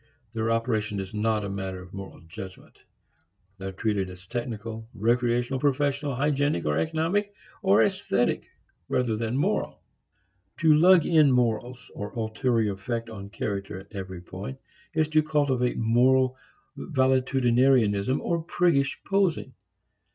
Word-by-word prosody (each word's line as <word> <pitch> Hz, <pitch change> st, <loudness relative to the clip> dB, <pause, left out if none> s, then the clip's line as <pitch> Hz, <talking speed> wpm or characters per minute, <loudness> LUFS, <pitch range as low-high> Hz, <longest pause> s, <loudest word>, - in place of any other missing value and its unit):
Their 110 Hz, 0 st, -1 dB
operation 110 Hz, -2 st, 0 dB
is 95 Hz, +1 st, -6 dB
not 105 Hz, 0 st, 0 dB
a -, -, -3 dB
matter 95 Hz, -1 st, -4 dB
of 90 Hz, 0 st, -13 dB
moral 100 Hz, 0 st, -9 dB
judgment. 90 Hz, +3 st, -10 dB, 0.8 s
They 95 Hz, -, -5 dB
are -, -, -4 dB
treated 100 Hz, -1 st, -1 dB
as 90 Hz, 0 st, -12 dB
technical, 115 Hz, 0 st, -5 dB
recreational, 120 Hz, +3 st, +1 dB
professional, 140 Hz, 0 st, 0 dB
hygienic 145 Hz, -, 0 dB
or 75 Hz, 0 st, +1 dB
economic 170 Hz, +6 st, -1 dB, 0.3 s
or 195 Hz, 0 st, +5 dB
esthetic 190 Hz, -10 st, 0 dB, 0.4 s
rather 120 Hz, -3 st, +1 dB
than 115 Hz, +3 st, -2 dB
moral. 145 Hz, -, -1 dB, 0.8 s
To 160 Hz, -2 st, +6 dB
lug 170 Hz, +2 st, +6 dB
in 155 Hz, -4 st, +5 dB
morals, 120 Hz, 0 st, +1 dB, 0.2 s
or 100 Hz, 0 st, -5 dB
ulterior 110 Hz, -1 st, 0 dB
effect 115 Hz, +4 st, -4 dB
on 100 Hz, -2 st, -8 dB
character 100 Hz, -3 st, -4 dB
at 95 Hz, +3 st, -13 dB
every 95 Hz, -3 st, -6 dB
point, 95 Hz, +9 st, -7 dB, 0.4 s
is 155 Hz, -1 st, +2 dB
to 155 Hz, 0 st, +4 dB
cultivate 140 Hz, -5 st, 0 dB
moral 130 Hz, +3 st, +3 dB, 0.4 s
valetudinarianism 130 Hz, -3 st, +2 dB
or 170 Hz, -1 st, -1 dB
priggish 165 Hz, -5 st, +1 dB
posing. 185 Hz, -9 st, 0 dB
120 Hz, 130 wpm, -26 LUFS, 105-140 Hz, 0.8 s, To